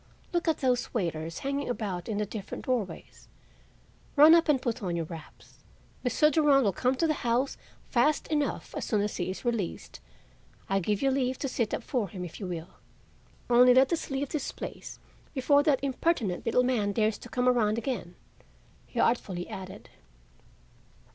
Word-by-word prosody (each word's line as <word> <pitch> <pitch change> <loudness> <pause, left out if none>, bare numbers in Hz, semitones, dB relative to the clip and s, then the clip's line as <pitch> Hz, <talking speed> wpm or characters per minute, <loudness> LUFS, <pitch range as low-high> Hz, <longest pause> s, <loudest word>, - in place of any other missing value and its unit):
Look 345 0 0
at 320 -2 +1
those 250 -1 +1
waiters 165 -5 -2
hanging 280 0 -1
about 200 -7 -3
in 210 - -1
the 210 - 0
different 205 -1 -7
doorways. 245 -7 -3 0.9
Run 305 +2 +9
up 335 -1 +4
and 285 -3 +4
put 240 -1 -3
on 180 -4 -2
your 165 -1 -2
wraps. 160 -1 -12 0.4
Mr. 300 +5 +3
Durand 290 -3 +4
will 200 -4 +2
come 255 +7 +1
to 330 - +1
the 310 - +2
house 245 +3 +1 0.3
fast 290 +5 +2
enough 295 -2 -1
as - - -4
soon 215 -4 +1
as 205 0 -2
he 180 - -2
is 190 - -6
released. 230 -7 -3 0.7
I 195 - +1
give 205 +4 -1
you 270 - +3
leave 260 -1 0
to 275 - -3
sit 235 -4 -1
up - - -3
for 235 -8 -1
him 180 0 -6
if 170 - -9
you 195 - -4
will; 170 -1 -5 0.8
only 245 +1 +6
let 265 +5 +5
us 330 - -2
leave 270 0 -2
this 305 - -3
place - - -8 0.4
before 285 +2 +4
that 290 -3 +2
impertinent 260 - 0
little 250 +2 +3
man 220 -5 +1
dares 215 0 +1
to 240 - -11
come 250 +1 0
around 225 -4 +3
again," 230 -7 -4 0.7
he - - -5
artfully 190 -7 0
added. 190 0 -9
245 Hz, 180 wpm, -28 LUFS, 200-275 Hz, 0.9 s, Run